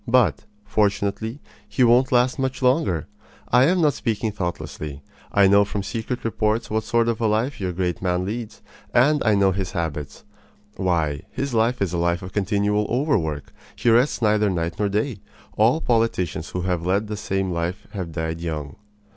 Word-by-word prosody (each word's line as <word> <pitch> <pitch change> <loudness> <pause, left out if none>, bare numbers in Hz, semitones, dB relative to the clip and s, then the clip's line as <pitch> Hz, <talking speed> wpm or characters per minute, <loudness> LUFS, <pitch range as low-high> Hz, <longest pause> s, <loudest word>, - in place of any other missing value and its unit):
But, 115 - +3 0.2
fortunately, 105 +4 0 0.3
he 130 - +2
won't 125 +2 +4
last 125 +2 +3
much 130 0 -2
longer. 125 - +2 0.4
I 125 +2 +5
am 180 +4 +3
not 150 -3 +4
speaking 110 -2 -2
thoughtlessly. 75 -7 -5 0.3
I 100 - +5
know 100 +1 +6
from 100 0 -3
secret 115 +5 -4
reports 110 0 0
what 110 0 0
sort 115 0 +2
of 115 -1 -1
a 115 - +3
life 110 +4 0
your 90 -1 -1
great 90 -1 -2
man 90 -1 0
leads, 110 +2 -5 0.3
and 150 +5 +4
I 110 -3 +3
know 100 -1 +4
his 95 -1 -3
habits. 75 -4 -4 0.5
Why, 80 -6 0
his 140 -1 -3
life 115 0 +2
is 90 -3 -2
a 85 - 0
life 85 +1 0
of 90 - -8
continual 105 +1 +1
overwork. 95 - -1 0.2
He 120 - +2
rests 120 +1 +3
neither 105 -1 +3
night 85 -2 -2
nor 105 -1 +1
day. 105 +2 -1 0.4
All 115 +8 +4
politicians 95 - 0
who 90 - -3
have 90 -2 -1
led 95 +4 +1
the 105 0 -4
same 95 -2 -2
life 85 +3 -3
have 90 -5 -5
died 80 +1 -3
young. 75 -3 -4
105 Hz, 180 wpm, -23 LUFS, 90-115 Hz, 0.5 s, know